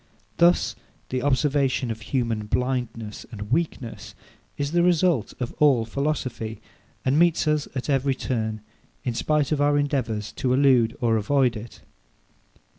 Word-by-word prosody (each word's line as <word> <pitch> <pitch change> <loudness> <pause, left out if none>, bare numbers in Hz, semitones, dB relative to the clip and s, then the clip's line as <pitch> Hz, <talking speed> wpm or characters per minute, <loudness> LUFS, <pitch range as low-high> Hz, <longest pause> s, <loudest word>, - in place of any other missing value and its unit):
Thus 175 +1 +4 0.3
the 130 0 -1
observation 135 -2 +1
of 110 0 -6
human 115 -2 -2
blindness 115 -3 -2
and 105 -1 -7
weakness 135 -6 -2 0.4
is 145 0 -2
the 175 +1 +3
result 170 - +2
of 125 -2 -3
all 135 -6 +4
philosophy, 125 -4 -3 0.5
and 135 +4 +3
meets 170 -1 +3
us 150 -1 +1
at 130 - -3
every 135 -1 +1
turn, 110 -4 -2 0.4
in 125 - -1
spite 150 +4 0
of 150 -2 +1
our 145 0 +3
endeavours 125 -7 -1
to 125 -1 +1
elude 130 -4 +4
or 115 -2 +3
avoid 125 +3 +2
it. 110 +2 -9
130 Hz, 140 wpm, -24 LUFS, 115-145 Hz, 0.5 s, Thus